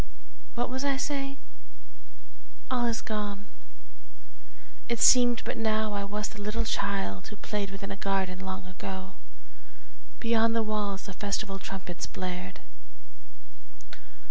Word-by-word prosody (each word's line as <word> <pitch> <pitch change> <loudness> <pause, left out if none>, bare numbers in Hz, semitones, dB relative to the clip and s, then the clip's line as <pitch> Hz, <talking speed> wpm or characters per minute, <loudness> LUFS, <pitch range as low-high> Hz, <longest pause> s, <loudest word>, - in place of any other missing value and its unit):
What 245 +1 0
was 260 +1 -1
I 280 -1 +3
saying? 275 -1 -1 1.3
All 245 -2 +3
is 230 0 0
gone 205 -2 -2
again. - - -26
It 235 -1 +1
seemed 245 -1 +7
but - - -1
now 220 -1 +2
I 200 0 0
was 210 +1 -2
the 220 -1 -8
little 215 +3 0
child 195 - 0
Who - - -7
played 205 -1 -2
within 195 0 -5
a - - -2
garden 190 -2 0
long 190 -1 -4
ago. 190 +1 -5 1.1
Beyond 230 -1 +4
the 230 - +4
walls 210 -2 -1
the 195 - -6
festal 200 0 -1
trumpets 185 -2 -4
blared. 180 - -4
205 Hz, 130 wpm, -30 LUFS, 195-230 Hz, 1.3 s, seemed